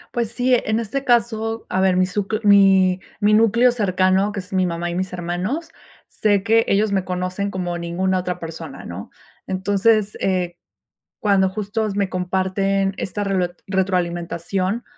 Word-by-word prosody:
Pues 235 -2 -1
sí, 250 +1 +1
eh, - - 0
en 220 +1 +1
este 250 +5 -3
caso, 225 -2 0
a 185 - 0
ver, 185 -1 +3
mi 185 - +4
suc 200 +3 -2
mi 190 -2 +5 0.2
mi 210 0 +3
núcleo 230 +3 +5
cercano, 190 -1 +2
que 200 - -4
es 185 +1 -10
mi 185 -1 +2
mamá 170 0 -2
y 175 - -4
mis 185 0 -2
hermanos. 180 - -3 0.4
Sé 205 -2 +1
que 225 +2 +3
ellos 200 +1 +2
me 190 -2 +1
conocen 185 +2 -3
como 175 -2 -3
ninguna 185 +2 -1
otra 180 0 -3
persona, 160 -3 -8
¿no?, 90 +4 -8 0.3
entonces, 205 +2 +1
eh, 180 -2 -1 0.6
cuando 195 -2 +3
justos 210 +1 -3
me 200 -2 +1
comparten 190 +2 0
esta 205 +2 -3
relo 185 -3 0 0.2
retroalimentación, 185 +2 -1
190 Hz, 160 wpm, -21 LUFS, 180-210 Hz, 0.6 s, mi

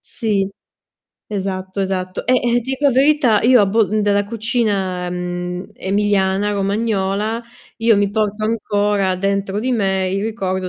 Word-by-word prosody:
Sì, 205 -4 -1 0.8
esatto, 190 -1 -4
esatto. 185 -1 -3
Eh, 255 - +3
eh, 245 -1 +2
ti 250 +3 -6
dico 275 +2 0
a - - +5
verità 265 -4 +3
io 245 0 +6
a 205 - +4
Bol 215 +1 +1
della 205 0 +2
cucina, 205 -5 -1
mhmm, 180 +1 -4
emiliana, 200 0 +1
romagnola 205 +2 -1 0.4
io 225 -1 +4
mi 200 0 +1
porto 215 0 -1
ancora 205 -3 0
dentro 195 +1 -1
di 255 +4 -1
me 190 -4 0
il 195 +1 -1
ricordo 190 -4 -2
205 Hz, 145 wpm, -19 LUFS, 190-225 Hz, 0.8 s, io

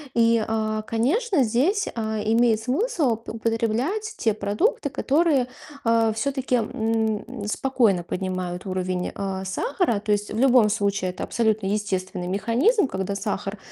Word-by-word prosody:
И, 230 -1 +4
а, 215 -1 -1
конечно, 285 - +1
здесь, 290 - +1
э, 220 -2 -2
имеет 230 -1 +4
смысл 280 - 0
уп 225 +1 -8
употреблять 230 - -1
те 220 - +1
продукты, 215 - 0
которые, 280 0 +2 0.4
э, 230 -1 +3
всё-таки, 265 +2 -1
м, 220 0 -1
спокойно 220 -6 +1
поднимают 185 0 -4
уровень, 185 -1 -2
э, 190 -1 -3
сахара. 285 - 0
То 210 - -2
есть 205 0 0
в - - -3
любом 250 -3 +5
случае 200 -3 0
это 180 - -6
абсолютно 220 -4 0
естественный 190 -3 -2
механизм, 240 - +2
когда 190 -2 -3
сахар 200 0 -3
225 Hz, 135 wpm, -24 LUFS, 200-260 Hz, 0.4 s, любом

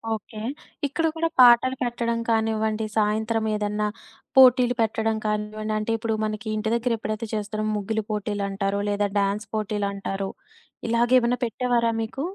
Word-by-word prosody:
Okay. 215 +1 -10 0.5
ఇక్కడ 325 +4 -1
కూడా 330 0 0
పాటలు 250 +1 +7
పెట్టడం 235 -1 -1
కానివ్వండి, 220 -1 +1
సాయంత్రం 220 +1 +1
ఏదన్నా 210 0 -1 0.5
పోటీలు 250 -1 +7
పెట్టడం 220 0 0
కానివ్వండి. 215 0 -2
అంటే, 215 +1 -2
ఇప్పుడు 225 0 -2
మనకి 215 +1 -4
ఇంటి 215 +1 -1
దగ్గర 235 +1 0
ఎప్పుడైతే 215 +1 -4
చేస్తారో 215 0 -2
ముగ్గులు 220 +2 -2
పోటీలంటారు, 200 -1 -2
లేదా 205 0 +1
డాన్స్ 200 +1 -1
పోటీలంటారు. 200 -2 -2 0.6
ఇలాగ 235 +1 +2
ఏమన్నా 240 0 0
పెట్టేవారా 235 0 +1
మీకు? 225 +5 -5
220 Hz, 130 wpm, -24 LUFS, 210-235 Hz, 0.6 s, పాటలు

